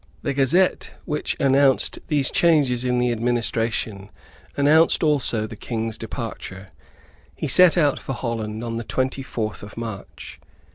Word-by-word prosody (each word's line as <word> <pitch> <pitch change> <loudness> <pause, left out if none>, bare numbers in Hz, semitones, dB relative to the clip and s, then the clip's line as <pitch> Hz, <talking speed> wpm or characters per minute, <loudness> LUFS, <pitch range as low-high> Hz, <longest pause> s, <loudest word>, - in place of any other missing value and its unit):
The 140 - -1
Gazette 145 +8 +1
which 150 - -3
announced 135 0 +3
these 145 -4 +1
changes 145 -8 +2
in 125 -1 0
the 125 0 +1
administration, 115 -3 -1 0.5
announced 155 +5 +4
also 135 -8 +1
the 110 - -8
King's 115 0 -4
departure. 105 -4 -7 0.7
He - - -4
set 180 -2 +6
out 145 -4 +2
for 135 - -5
Holland 115 -3 -4
on 115 -1 -4
the 115 - -4
twenty 130 +3 -2
fourth 110 -5 -4
of 105 +2 -11
March. 115 -4 -8
125 Hz, 140 wpm, -22 LUFS, 115-140 Hz, 0.7 s, set